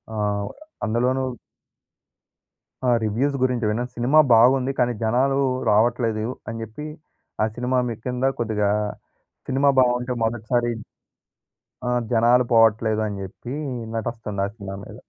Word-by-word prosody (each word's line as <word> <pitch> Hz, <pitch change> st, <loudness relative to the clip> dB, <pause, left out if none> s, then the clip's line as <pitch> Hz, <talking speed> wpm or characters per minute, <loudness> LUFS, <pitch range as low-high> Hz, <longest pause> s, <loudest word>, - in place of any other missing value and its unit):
ఆహ్, 105 Hz, -1 st, -1 dB, 0.4 s
అందులోనూ 125 Hz, +4 st, +1 dB, 1.6 s
ఆ -, -, +4 dB
రివ్యూస్ 125 Hz, +7 st, 0 dB
గురించి 125 Hz, -3 st, +1 dB
విన్న 110 Hz, +3 st, -1 dB
సినిమా 125 Hz, +6 st, +4 dB
బాగుంది. 125 Hz, +3 st, +5 dB
కానీ, 120 Hz, -1 st, +2 dB
జనాలు 130 Hz, +5 st, +2 dB, 0.3 s
రావట్లేదు 110 Hz, 0 st, +2 dB, 0.2 s
అని 115 Hz, 0 st, -5 dB
జెప్పి 115 Hz, +8 st, -7 dB, 0.6 s
ఆ -, -, +4 dB
సినిమా 125 Hz, +1 st, 0 dB
మీకిింద 125 Hz, +3 st, -3 dB
కొద్దిగా 105 Hz, -3 st, 0 dB, 0.8 s
సినిమా 135 Hz, +2 st, +3 dB
బావుంటె 125 Hz, 0 st, +2 dB
మొదటిసారి 120 Hz, +1 st, 0 dB, 1.2 s
ఆహ్, 125 Hz, 0 st, +1 dB
జనాలు 120 Hz, +2 st, +4 dB
పోవట్లేదని 110 Hz, -2 st, +3 dB
జెప్పి, 120 Hz, +7 st, -7 dB, 0.4 s
నటస్తంది 110 Hz, -3 st, -3 dB
ఆ -, -, -1 dB
సినిమా 100 Hz, -3 st, -7 dB
మీద. -, -, -10 dB
120 Hz, 110 wpm, -23 LUFS, 110-125 Hz, 1.6 s, బాగుంది